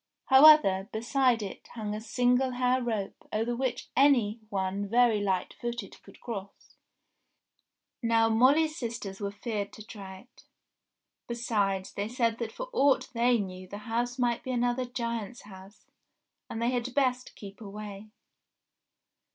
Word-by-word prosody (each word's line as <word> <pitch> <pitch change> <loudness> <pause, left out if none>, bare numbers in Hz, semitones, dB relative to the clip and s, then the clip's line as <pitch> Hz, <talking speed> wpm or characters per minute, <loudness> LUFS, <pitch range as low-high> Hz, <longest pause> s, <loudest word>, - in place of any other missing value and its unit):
However, 265 -9 +7
beside 240 +1 +1
it, 195 - -8
hung 210 -2 -4
a 215 - -4
Single 250 +3 +1
Hair 250 +1 +1
rope 220 -5 -4
over 225 +3 -1
which 255 0 -3
any 245 -6 +4
one 195 0 -2
very 235 -2 +4
light 190 -3 -1
footed 240 0 -5
could - - -17
cross. 200 -5 -8 1.3
Now 230 -1 +3
Molly's 280 +8 +4
sisters 225 - -5
were 200 - -1
feared 205 0 -4
to 215 - -11
try 190 -4 -9
it; 245 - -22 0.8
besides 205 -5 -1
they 200 +1 -3
said 230 -1 0
that 230 -2 -3
for - - -6
aught 280 - +3
they 240 +1 +3
knew 185 -3 -5
the 200 - -7
house 240 +2 -1
might 240 -2 +1
be - - -7
another 245 +1 0
giant's 235 -2 -4
house, 195 0 -14 0.6
and 225 - -5
they 235 +1 +1
had 245 0 -3
best 255 -3 0
keep 200 +1 -11
away. 205 0 -8
230 Hz, 145 wpm, -29 LUFS, 205-245 Hz, 1.3 s, However